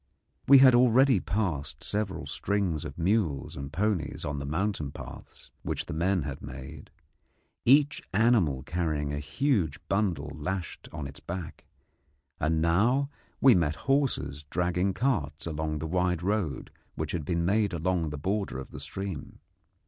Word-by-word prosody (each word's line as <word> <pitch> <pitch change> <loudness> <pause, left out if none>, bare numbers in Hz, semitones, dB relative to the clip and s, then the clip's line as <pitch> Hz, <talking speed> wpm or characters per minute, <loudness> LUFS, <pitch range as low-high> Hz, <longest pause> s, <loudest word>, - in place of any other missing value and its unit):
We 140 - +10
had 130 -1 +8
already 125 0 +5
passed 90 -8 -2
several 105 -2 -2
strings 95 -7 -1
of 70 -2 -7
mules 85 -6 0
and 70 +1 -6
ponies 95 -7 -1
on 70 0 -3
the 70 - -5
mountain 80 -2 -1
paths - - -11
which - - -3
the - - -5
men 90 +2 +1
had 70 -1 -5
made, 65 +1 -9 0.8
each 145 +3 +5
animal 100 - +3
carrying 80 -3 -1
a 70 - -2
huge 80 - 0
bundle 90 -8 0
lashed 85 +4 -5
on 75 - -5
its 70 +2 -8
back; 90 0 -7 0.7
and 80 +1 +1
now 120 +12 +2 0.3
we 130 -2 +8
met 80 -6 +2
horses 130 - +1
dragging 90 +3 0
carts 90 - -1
along 80 -1 -2
the 75 - -4
wide 90 0 0
road 95 -9 -1 0.2
which - - -3
had 85 - -2
been 85 +2 0
made 100 +2 +2
along 85 -1 0
the 75 - -5
border 95 -1 -2
of 65 - -8
the - - -8
stream. 95 -7 -5
90 Hz, 150 wpm, -28 LUFS, 75-105 Hz, 0.8 s, We